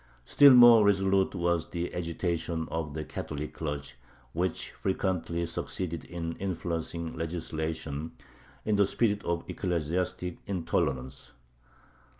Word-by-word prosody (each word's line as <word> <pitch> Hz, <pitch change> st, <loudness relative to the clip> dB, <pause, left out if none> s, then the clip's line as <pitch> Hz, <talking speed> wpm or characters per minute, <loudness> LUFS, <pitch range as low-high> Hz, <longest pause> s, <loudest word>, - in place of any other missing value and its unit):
Still 140 Hz, -2 st, +8 dB
more 120 Hz, -3 st, +9 dB
resolute 95 Hz, -1 st, +3 dB
was 85 Hz, -2 st, 0 dB
the 85 Hz, 0 st, -3 dB
agitation 85 Hz, -1 st, -2 dB
of 80 Hz, -3 st, -3 dB
the 80 Hz, -, -3 dB
Catholic 75 Hz, +2 st, -5 dB
clergy, 75 Hz, -3 st, -4 dB, 0.4 s
which 90 Hz, +1 st, -2 dB
frequently 90 Hz, -3 st, -1 dB
succeeded 85 Hz, 0 st, -4 dB
in 85 Hz, -1 st, -5 dB
influencing 85 Hz, -3 st, -3 dB
legislation 80 Hz, -2 st, -4 dB, 0.5 s
in 105 Hz, -1 st, +2 dB
the 100 Hz, -1 st, +4 dB
spirit 105 Hz, -2 st, +1 dB
of 85 Hz, 0 st, -1 dB
ecclesiastic 90 Hz, +1 st, -2 dB
intolerance. 70 Hz, -8 st, -2 dB
85 Hz, 110 wpm, -29 LUFS, 80-95 Hz, 0.5 s, more